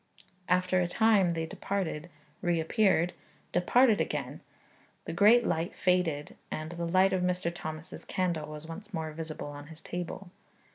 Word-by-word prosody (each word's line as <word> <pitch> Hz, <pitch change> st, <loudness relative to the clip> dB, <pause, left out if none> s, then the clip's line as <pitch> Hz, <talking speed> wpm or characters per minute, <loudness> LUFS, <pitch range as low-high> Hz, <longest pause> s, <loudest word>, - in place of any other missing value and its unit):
After 180 Hz, +1 st, +3 dB
a 175 Hz, -, +1 dB
time 210 Hz, -1 st, +4 dB
they 165 Hz, -1 st, -1 dB
departed; 175 Hz, -2 st, -3 dB, 0.3 s
reappeared; 175 Hz, +1 st, +2 dB, 0.4 s
departed 220 Hz, +5 st, +4 dB
again; -, -, -3 dB, 0.6 s
the -, -, -4 dB
great 230 Hz, +4 st, +6 dB
light 170 Hz, +3 st, -1 dB
faded; 180 Hz, -5 st, +1 dB
and 155 Hz, +1 st, -4 dB
the 170 Hz, 0 st, -3 dB
light 185 Hz, +2 st, +4 dB
of 185 Hz, -, +1 dB
Mr. 180 Hz, -1 st, 0 dB
Thomas's 155 Hz, -1 st, -7 dB
candle 170 Hz, -5 st, -1 dB
was 150 Hz, 0 st, -8 dB
once 200 Hz, +6 st, -8 dB
more 160 Hz, -1 st, -3 dB
visible 155 Hz, -1 st, -6 dB
on 145 Hz, 0 st, -9 dB
his 160 Hz, 0 st, -12 dB
table. 175 Hz, +1 st, -6 dB
175 Hz, 145 wpm, -30 LUFS, 160-185 Hz, 0.6 s, great